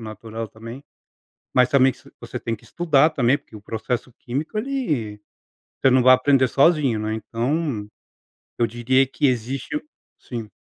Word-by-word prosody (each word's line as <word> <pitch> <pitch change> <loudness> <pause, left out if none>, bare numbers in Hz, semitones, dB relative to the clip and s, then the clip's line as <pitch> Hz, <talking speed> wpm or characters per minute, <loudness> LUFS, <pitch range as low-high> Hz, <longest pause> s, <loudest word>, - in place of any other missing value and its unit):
natural 110 +1 -7
também. 115 +5 -10 0.7
Mas 125 -1 +4
também 135 -1 +4
se 140 +2 -19
você 120 +1 -6
tem 115 -1 -3
que - - -21
estudar 160 -3 +3
também, 135 -1 +2
porque 115 - -18
o 105 - -10
processo 120 +3 -4
químico 145 - -4
ele 155 - -2 0.6
você 135 - +4
não 130 - +5
vai 130 +1 +8
aprender 130 0 +3
sozinho, 140 -6 +3
né. 110 0 -2
Então, 120 +1 -2 0.7
eu 120 - +2
diria 125 +4 +2
que 135 - 0
existe 130 - -1 0.4
sim. 115 -4 -7
125 Hz, 150 wpm, -22 LUFS, 115-140 Hz, 0.7 s, vai